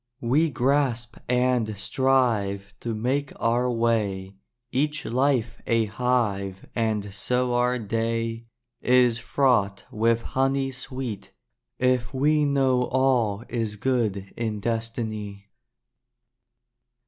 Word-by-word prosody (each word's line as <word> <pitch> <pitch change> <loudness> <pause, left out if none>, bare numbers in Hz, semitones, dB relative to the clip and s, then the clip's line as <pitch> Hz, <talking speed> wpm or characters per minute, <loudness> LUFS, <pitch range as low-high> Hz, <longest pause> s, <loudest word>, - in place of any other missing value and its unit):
We 145 +8 +2
grasp 125 -3 0
and 125 -4 +1
strive 105 -4 +1
to 115 -2 -3
make 135 +6 -1
our 120 +2 +1
way, 110 -5 0 0.4
Each 150 +3 0
life 125 -1 0
a 115 -1 +3
hive 105 -4 -1
and 110 -3 -1
so 125 +4 0
our 125 +1 +2
day 115 +1 -2 0.3
Is 125 -2 +4
fraught 115 -6 +1
with 115 +1 +1
honey 135 0 0
sweet, 125 -4 -6 0.4
if 125 0 +1
we 150 +2 +3
Know 135 -3 +2
all 125 -6 +1
is 115 -3 -2
good 105 -5 -1
in 110 -3 -2
destiny. 110 -3 -4
120 Hz, 100 wpm, -25 LUFS, 110-130 Hz, 0.4 s, Is